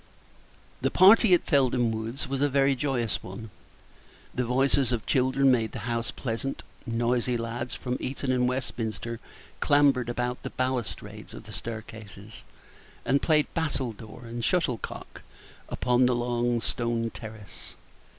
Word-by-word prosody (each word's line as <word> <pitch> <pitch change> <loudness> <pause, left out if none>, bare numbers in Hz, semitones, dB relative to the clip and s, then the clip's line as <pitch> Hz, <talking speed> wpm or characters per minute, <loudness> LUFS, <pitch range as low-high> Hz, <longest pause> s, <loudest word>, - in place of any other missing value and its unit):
The - - +2
party 200 +2 +7
at - - -2
Felden 130 -5 +3
Woods 115 +6 -4
was 135 0 -2
a 145 - +3
very 140 0 +3
joyous 125 -5 -1
one. 105 +4 -8 0.8
The 125 - 0
voices 130 +1 +2
of 115 -3 -1
children 130 +1 +3
made 115 -3 +1
the - - -6
house 120 +1 -1
pleasant; 135 +1 -4 0.2
noisy 120 +1 +1
lads 120 +2 -4
from 125 -1 -3
Eton 135 0 -2
and 125 -1 +2
Westminster 115 -2 -3 0.4
clambered 140 -4 +3
about 125 +1 -2
the - - -5
balustrades 130 -3 -3
of - - -9
the - - -11
staircases, 110 -2 -8 0.6
and 140 +2 +2
played 155 -2 +3
battledoor 125 -8 -3
and 115 0 -5
shuttlecock 130 - -2 0.5
upon 125 0 +2
the 125 - +2
long 120 0 0
stone 115 -1 -1
terrace. 110 -4 -10
125 Hz, 135 wpm, -27 LUFS, 115-135 Hz, 0.8 s, party